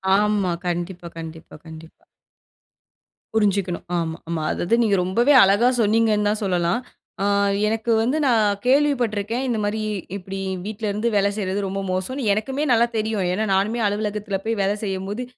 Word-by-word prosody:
ஆமா. 205 -3 +1 0.2
கண்டிப்பா 175 0 -3
கண்டிப்பா 160 0 -9
கண்டிப்பா. 160 0 -13 1.3
புரிஞ்சுக்கணும். 200 -5 0
ஆமா 165 -1 -2
ஆமா. 160 -2 -2
அதாவது 205 +7 +1
நீங்க 205 -3 +2
ரொம்பவே 235 +10 +3
அழகா 205 +6 +4
சொன்னீங்கன்னு 215 -1 +2
தான் 215 +1 -1
சொல்லலாம். 180 +2 +1 0.4
ஆ - - +1 0.4
எனக்கு 225 +2 -1
வந்து 255 +6 0
நான் 210 -4 +3
கேள்விப்பட்ருக்கேன், 245 -4 +1
இந்த 235 -3 0
மாரி 210 +1 -1 0.3
இப்டி 195 0 -6 0.3
வீட்லருந்து 215 +1 -2
வேல 200 0 +3
செய்றது 195 -1 -2
ரொம்ப 195 +1 -3
மோசம்னு 245 +9 -2
எனக்குமே 265 +8 -2
நல்லா 235 0 +4
தெரியும். 215 -2 -1
ஏன்னா 215 +4 0
நானுமே 205 +5 +1
அலுவலகத்துல 210 -1 -2
போய் 225 -1 -1
வேலை 200 +2 +1
செய்யும்போது, 195 +4 -3
205 Hz, 140 wpm, -22 LUFS, 190-225 Hz, 1.3 s, அழகா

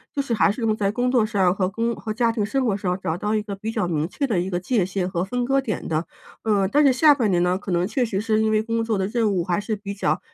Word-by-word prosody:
就 - - -2
是 275 -4 -1
还 205 - +3
是 225 +4 -6
用 220 -1 +1
在 200 -2 0
工 250 +3 0
作 245 -4 +3
上 195 -5 +2
和 185 -1 0
工 230 +4 -1
和 215 - -6
家 230 +1 +1
庭 220 -3 -1
生 260 +5 0
活 210 - +1
上 185 -1 -2
找 160 - -1
到 210 +4 -1
一 215 - 0
个 200 -2 -5
比 215 +3 -5
较 215 -6 -1
明 160 0 -1
确 280 - -2
的 220 -9 0
一 185 +2 -2
个 175 -1 -1
界 210 +1 +1
限 190 0 -2
和 175 -1 -2
分 245 +4 -2
割 270 +1 +2
点 215 -8 -4
的。 160 +1 -1 0.4
嗯， 205 -3 +2
但 295 +1 +4
是 275 - +6
下 295 +4 +6
半 240 -7 0
年 175 -2 +2
呢， 180 +1 +2
可 195 - -6
能 175 0 +1
确 255 +2 0
实 210 -4 -1
是 215 +1 +1
因 220 - +2
为 215 0 +2
工 230 0 -1
作 225 -2 -1
的 190 - 0
任 220 0 0
务 180 -3 0
还 180 +3 -1
是 215 +1 -2
比 200 -1 -6
较 160 -4 0
210 Hz, 335 characters per minute, -23 LUFS, 185-230 Hz, 0.4 s, 是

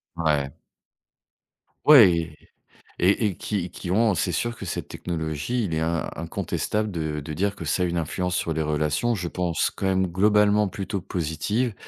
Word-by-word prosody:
Ouais. 75 -4 0 1.3
Ouais, 85 - +6 0.6
et 100 +5 +3
et 95 - -4
qui 95 -4 -3
qui 90 - -7
ont, 110 +3 +3
c'est 90 0 -1
sûr 120 +6 -2
que - - -7
cette 85 - -4
technologie, 80 +8 -3
il 85 -6 -2
est 80 - 0
in 85 +1 -1
incontestable 105 +5 -2
de 80 -3 -3
de 75 +2 -6
dire 100 +6 -1
que - - -7
ça 80 +4 0
a - - +2
une 85 0 -1
influence 90 +3 -2
sur 85 - -1
les 80 - -1
relations. 75 +9 0
Je 90 -4 -3
pense 90 -3 0
quand - - -3
même 95 0 +2
globalement 105 +3 +3
plutôt 100 +1 -4
positive, 95 +7 -2
90 Hz, 170 wpm, -25 LUFS, 80-105 Hz, 1.3 s, Ouais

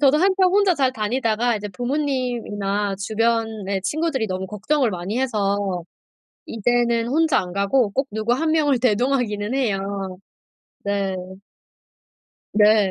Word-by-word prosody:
저도 285 +1 +5
한참 375 +1 +4
혼자 390 -2 +4
잘 265 -3 +1
다니다가 230 0 0
이제 210 0 -5
부모님이나 240 -5 -2
주변에 220 -1 -1
친구들이 290 - -1
너무 185 0 -3
걱정을 225 +6 0
많이 185 +6 -3
해서 200 -6 0 0.6
이제는 235 +1 +1
혼자 310 0 +3
안 180 -1 -6
가고 200 +4 +2
꼭 270 +6 -1
누구 220 +3 0
1 315 +5 0
명을 290 -5 +2
대동하기는 240 -2 +1
해요. 195 -6 -2 0.7
네. 200 -1 -1 1.4
네. 210 -2 +4
225 Hz, 260 characters per minute, -22 LUFS, 200-265 Hz, 1.4 s, 저도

